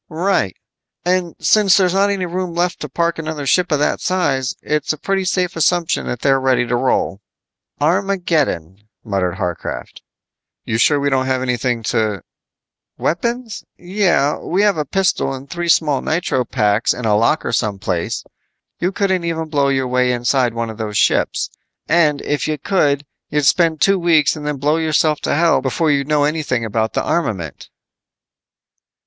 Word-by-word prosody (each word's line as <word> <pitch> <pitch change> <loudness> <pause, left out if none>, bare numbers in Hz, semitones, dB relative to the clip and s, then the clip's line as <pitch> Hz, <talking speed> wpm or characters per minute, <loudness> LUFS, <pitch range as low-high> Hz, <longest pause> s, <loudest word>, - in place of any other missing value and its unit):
"Right. 165 - 0 0.5
And 180 -1 0
since 205 -4 +4
there's 185 -2 +2
not 200 +1 +3
any 195 -2 -1
room 180 0 -4
left 175 0 0
to 150 - -6
park 170 +4 -1
another 155 -2 -4
ship 180 +6 +2
of 150 - +3
that 145 - 0
size, 145 -8 0
it's 150 0 -1
a 155 - -4
pretty 195 +4 -1
safe 180 -1 0
assumption 170 +1 +1
that 120 - -4
they 140 - +3
are 135 - +3
ready 130 -2 +2
to 120 - -1
roll." 120 -5 0 0.6
"Armageddon," 160 - 0 0.2
muttered 95 -5 -1
Harcraft. 90 -2 -5 0.6
"You 110 - -1
sure 145 +4 +4
we 140 0 0
don't 130 -1 +1
have 130 -1 0
anything 125 -2 -1
to 105 -5 0 0.4
" - - -67
"Weapons? 235 +6 -2
Yeah. 175 -6 +1
We 190 +4 0
have 205 -2 +3
a 150 - -1
pistol 190 -5 0
and 135 +1 -10
three 170 +2 -4
small 150 -4 +3
nitro 155 -6 -1
paks 105 -2 +1
in 125 - -5
a 105 -1 +3
locker 115 +9 +1
some 105 -3 0
place. 90 -4 -3 0.6
You 180 +2 0
couldn't 190 -2 0
even 160 -1 -3
blow 140 -2 +1
your 135 -1 0
way 125 0 +1
inside 120 0 +1
one 115 -1 -2
of 110 - -12
those 105 -2 -3
ships. - - +1 0.4
And 155 -4 +2
if 145 +1 -1
you 155 -1 -1
could, 145 -6 +1 0.2
you'd 150 -1 0
spend 160 +1 +3
two 195 -1 +4
weeks 165 -4 +3
and 150 -1 -6
then 150 -1 -2
blow 150 +4 +1
yourself 155 -1 +1
to - - 0
hell 165 -3 +3
before 150 +4 0
you'd 140 -1 0
know 150 -1 +2
anything 145 -6 -1
about 110 0 -1
the - - 0
armament." 100 - -3
150 Hz, 175 wpm, -18 LUFS, 125-175 Hz, 0.6 s, since